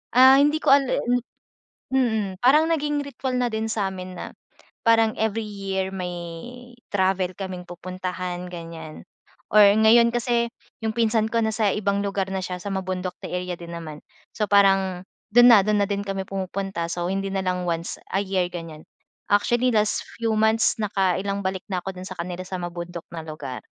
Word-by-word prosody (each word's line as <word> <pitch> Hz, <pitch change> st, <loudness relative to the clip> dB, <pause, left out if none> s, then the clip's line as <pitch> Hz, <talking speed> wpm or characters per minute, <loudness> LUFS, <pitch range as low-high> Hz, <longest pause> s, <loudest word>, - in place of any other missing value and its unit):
ah, 260 Hz, +1 st, +9 dB
hindi 295 Hz, +2 st, +3 dB
ko -, -, +4 dB
ale 275 Hz, -2 st, +1 dB, 1.0 s
mm. 220 Hz, -7 st, 0 dB
Parang 300 Hz, +5 st, +6 dB
naging 295 Hz, -2 st, 0 dB
ritual 260 Hz, -1 st, -3 dB
na 245 Hz, -, +2 dB
din 220 Hz, 0 st, -2 dB
sa 205 Hz, -4 st, 0 dB
amin 185 Hz, -1 st, -7 dB
na -, -, -5 dB, 0.6 s
parang 225 Hz, -1 st, +5 dB
every 220 Hz, 0 st, 0 dB
year, 195 Hz, -2 st, -3 dB
may 180 Hz, -1 st, -3 dB, 0.8 s
travel 190 Hz, -2 st, +1 dB
kaming 185 Hz, -2 st, -5 dB
pupuntahan, 180 Hz, 0 st, -5 dB
ganyan. 165 Hz, -2 st, -8 dB, 0.5 s
Or 215 Hz, -, +8 dB
ngayon 220 Hz, +3 st, +6 dB
kasi 235 Hz, 0 st, +1 dB, 0.4 s
yung 220 Hz, -, 0 dB
pinsan 220 Hz, -1 st, +2 dB
ko 230 Hz, -, +2 dB
nasa 215 Hz, -2 st, +1 dB
ibang 200 Hz, -1 st, 0 dB
lugar 200 Hz, -1 st, -1 dB
na 190 Hz, -, -1 dB
siya, 185 Hz, -, -4 dB
sa 200 Hz, +2 st, -5 dB
mabundok 185 Hz, -1 st, -3 dB
na -, -, -5 dB
area 180 Hz, 0 st, -3 dB
din 170 Hz, 0 st, -9 dB
naman. 155 Hz, -3 st, -7 dB, 0.3 s
So, 210 Hz, -2 st, -1 dB
parang 195 Hz, -2 st, +3 dB, 0.3 s
dun 245 Hz, +1 st, +8 dB
na 215 Hz, -, +9 dB
dun 210 Hz, +1 st, +1 dB
na -, -, +3 dB
din 200 Hz, -1 st, -1 dB
kami 195 Hz, -1 st, -2 dB
pumupunta. 195 Hz, -2 st, -3 dB
So, 175 Hz, 0 st, -2 dB
hindi 195 Hz, 0 st, -1 dB
nalang 185 Hz, -2 st, -1 dB
once 170 Hz, 0 st, -3 dB, 0.2 s
a -, -, +3 dB
year, 190 Hz, -2 st, 0 dB
ganyan. 165 Hz, -3 st, -8 dB, 0.5 s
Actually, 240 Hz, +5 st, +3 dB
last 210 Hz, 0 st, +1 dB, 0.2 s
few 225 Hz, -1 st, 0 dB
months 220 Hz, +1 st, +3 dB
nakailang 195 Hz, 0 st, 0 dB
balik 190 Hz, -1 st, -2 dB
na 180 Hz, -, 0 dB
ako 190 Hz, -1 st, -5 dB
dun 185 Hz, -, -7 dB
sa 185 Hz, -, -7 dB
kanila 180 Hz, +1 st, -4 dB
sa 190 Hz, -, -5 dB
mabundok 175 Hz, 0 st, -6 dB
na 165 Hz, -1 st, -5 dB
lugar. 155 Hz, -5 st, -6 dB
195 Hz, 175 wpm, -24 LUFS, 180-220 Hz, 1.0 s, ah